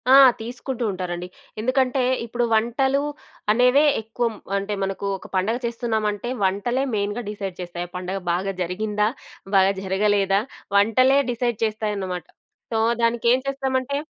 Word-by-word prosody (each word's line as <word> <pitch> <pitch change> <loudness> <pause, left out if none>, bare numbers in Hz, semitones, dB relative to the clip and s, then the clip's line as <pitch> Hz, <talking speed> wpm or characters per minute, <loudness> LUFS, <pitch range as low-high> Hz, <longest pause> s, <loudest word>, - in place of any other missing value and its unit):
ఆ! - - +8 0.3
తీసుకుంటూ 245 +2 -5
ఉంటారండి. 180 -1 -4 0.3
ఎందుకంటే, 255 +3 +1 0.2
ఇప్పుడు 240 +1 -2
వంటలు 265 +5 +2 0.5
అనేవే, 250 +5 +5 0.2
ఎక్కుం 225 +1 -2 0.2
అంటే, 200 +1 -2
మనకు 195 +1 -3
ఒక - - -12
పండగ 205 +6 +1
చేస్తున్నామంటే, 225 -2 -1
వంటలే 205 +7 +1
మెయిన్‌గా 205 +3 -1
డిసైడ్ 195 -3 -5
చేస్తాయి, 175 0 -5
ఆ - - -37
పండగ 185 +2 -4
బాగా 190 +3 -1
జరిగిందా? 210 +4 0 0.5
బాగా 190 +1 +5
జరగలేదా? 195 0 +2 0.4
వంటలే 255 +7 +5
డిసైడ్ 240 -2 -1
చేస్తాయన్నమాట. 205 -5 -3 0.5
సో, 225 - 0 0.3
దానికేం 235 +2 +3
చేస్తామంటే 270 0 -1
215 Hz, 125 wpm, -23 LUFS, 195-245 Hz, 0.5 s, ఆ